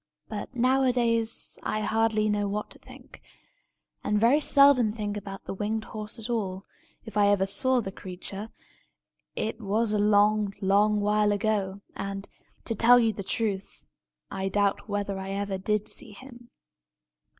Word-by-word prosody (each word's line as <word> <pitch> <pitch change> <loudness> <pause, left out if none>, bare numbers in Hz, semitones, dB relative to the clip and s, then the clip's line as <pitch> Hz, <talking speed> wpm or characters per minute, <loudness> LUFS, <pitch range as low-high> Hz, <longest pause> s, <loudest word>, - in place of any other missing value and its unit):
But, 215 +4 -6
nowadays, 245 -3 +1
I 215 - -2
hardly 220 0 +1
know 205 -1 0
what 210 +1 -4
to - - -14
think, - - -15 0.8
and 210 0 +1
very 240 +7 +4
seldom 275 -6 +5
think 210 -2 -4
about 195 -1 -7
the - - -5
winged 215 +3 -2
horse 215 +1 -6
at 225 -1 -6
all. 195 -5 -3 0.4
If 220 -2 -7
I 205 -1 +5
ever 200 -1 +3
saw 255 +6 +1
the 195 - -5
creature, 195 +3 -8 0.9
it 225 +2 -3
was 215 +2 0
a 210 - +1
long, 205 0 +3
long 205 +2 +3
while 210 0 +2
ago; 200 -2 -1
and, 195 0 -5 0.4
to 230 - -1
tell 240 +3 +6
you 225 -2 +2
the 200 - -6
truth, 200 -1 -3 0.5
I 195 0 -2
doubt 205 +1 0
whether 200 -1 -2
I 190 0 -6
ever 200 -1 -3
did 210 +2 -1
see 210 - -3
him. 240 0 -13
210 Hz, 155 wpm, -27 LUFS, 200-225 Hz, 0.9 s, tell